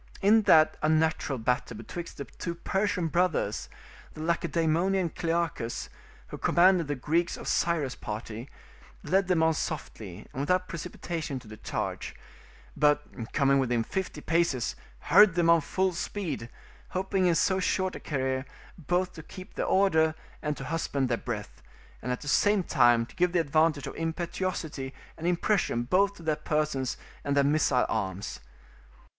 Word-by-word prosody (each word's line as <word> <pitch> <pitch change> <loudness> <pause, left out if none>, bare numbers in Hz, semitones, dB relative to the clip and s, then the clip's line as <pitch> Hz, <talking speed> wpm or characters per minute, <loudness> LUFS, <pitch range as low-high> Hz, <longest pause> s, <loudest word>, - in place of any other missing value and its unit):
In 210 +3 +5
that 155 0 +6
unnatural 155 -3 +1
battle 120 -1 -1
betwixt 170 +10 -7
the 140 - -5
two 170 +5 -6
Persian 190 +1 0
brothers, 165 - 0 0.5
the 155 - -7
Lacedaemonian 170 +2 +1
Clearchus, 165 -9 -2 0.4
who - - -7
commanded 175 -2 +4
the 145 - -1
Greeks 165 +6 0
of - - -8
Cyrus' 155 -7 +1
party, 110 +3 -6 0.5
led 190 0 +2
them 175 -3 +3
on 160 0 +4
softly 110 - -5
and - - -5
without 180 +6 +1
precipitation 165 -3 -4
to 125 -3 -11
the 110 0 -10
charge; - - -4 0.6
but, 150 -5 0
coming 140 -1 +3
within 120 -3 +1
fifty 185 0 -4
paces, 165 -7 +1 0.3
hurried 210 -5 +6
them 170 -1 +4
on 170 -1 +5
full 185 +5 0
speed, 165 - -4 0.4
hoping 190 0 0
in 170 - +3
so 190 +3 +2
short 185 0 0
a - - -6
career 130 -2 -2 0.3
both 180 +3 0
to 160 - -9
keep 185 +4 -11
their - - -2
order 160 -5 +3 0.3
and 150 -1 -2
to - - -6
husband 140 -3 -1
their 120 - +1
breath, 105 -4 -6 0.4
and 125 - -3
at 125 - -3
the 145 - -8
same 205 +6 +3
time 120 -7 +4
to - - -18
give 180 -1 +2
the 175 - +3
advantage 155 -1 +2
of - - -6
impetuosity 165 -4 -3 0.2
and 165 - -4
impression 175 - +1
both 195 +9 +2
to 170 - -13
their 155 -1 +1
persons 150 -4 -1 0.3
and 140 0 0
their 140 - +5
missile 140 -3 +3
arms. 95 -3 -3
160 Hz, 155 wpm, -28 LUFS, 135-180 Hz, 0.6 s, that